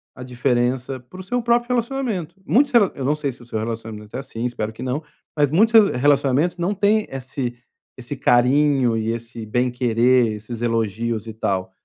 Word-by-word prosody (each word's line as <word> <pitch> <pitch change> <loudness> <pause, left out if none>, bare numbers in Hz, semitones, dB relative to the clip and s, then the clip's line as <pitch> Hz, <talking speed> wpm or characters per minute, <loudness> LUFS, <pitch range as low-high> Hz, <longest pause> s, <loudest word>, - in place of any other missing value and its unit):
a 125 - -8
diferença 125 +1 -1
para 125 +9 -14
o 185 - -6
seu 245 +6 -1
próprio 240 +1 +1
relacionamento. 230 - -2
Muitos 280 +5 +3
rela 210 -6 +5
eu 135 - -4
não 145 +3 +2
sei 150 -2 -2
se 125 - -15
o - - -13
seu 110 -2 -4
relacionamento 110 -2 -6
é - - -2
assim, 130 -4 -7
espero 110 -3 -3
que - - -11
não, 130 +5 -2 0.3
mas 145 -2 +2
muitos 220 +8 +4 0.2
re - - -3
relacionamentos 145 +4 +2
não 175 +4 0
têm 210 +2 +2
esse 130 -2 -5 0.4
esse 125 +3 -6
carinho 125 -1 +3
e 110 +1 -1
esse 115 -1 -6
bem 125 +3 0
querer, 120 -1 +2
esses 110 +2 -7
elogios 115 -1 -1
e 110 - -6
tal, 95 -3 -2
125 Hz, 190 wpm, -21 LUFS, 115-160 Hz, 0.4 s, rela